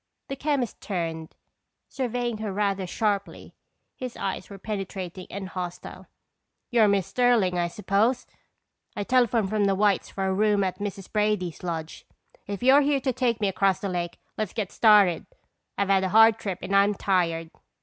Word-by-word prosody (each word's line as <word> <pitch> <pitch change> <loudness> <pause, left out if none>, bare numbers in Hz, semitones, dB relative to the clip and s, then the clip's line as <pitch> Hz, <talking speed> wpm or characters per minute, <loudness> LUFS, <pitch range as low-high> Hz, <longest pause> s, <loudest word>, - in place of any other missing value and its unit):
The 275 - -3
chemist 275 -4 -2
turned, 165 -4 -4 0.5
surveying 245 -3 -3
her 215 -2 -3
rather 195 -1 -1
sharply. 205 +1 -2 0.4
His 255 -2 -7
eyes 190 - -4
were 200 - -9
penetrating 190 -3 -6
and 195 -1 -6
hostile. 180 -2 -7 0.6
"You're 230 -3 +5
Miss 200 -3 +2
Sterling, 230 -8 +2
I 175 - +1
suppose? 210 +7 0 0.7
I 205 - -2
telephoned 235 -3 +2
from 210 -1 +2
the 195 -1 +2
White's 200 -1 +1
for 195 - -3
a 190 - +1
room 205 0 +2
at 185 0 -3
Mrs. 200 -2 -6
Brady's 210 -5 0
lodge. 165 -3 -5 0.4
If 200 +2 -5
you're 270 +3 +6
here 285 -1 +2
to 265 -1 -1
take 235 -2 0
me 205 - +2
across 195 0 +1
the 200 - -3
lake, 175 -1 -3 0.2
let's 215 -3 -2
get 210 -5 -3
started. 205 -7 +4 0.5
I've 200 0 0
had 195 -1 +3
a 190 - 0
hard 225 +2 +6
trip 190 -4 -4
and 195 - -1
I'm 200 +1 +4
tired." 165 -4 0
200 Hz, 170 wpm, -26 LUFS, 185-220 Hz, 0.7 s, you're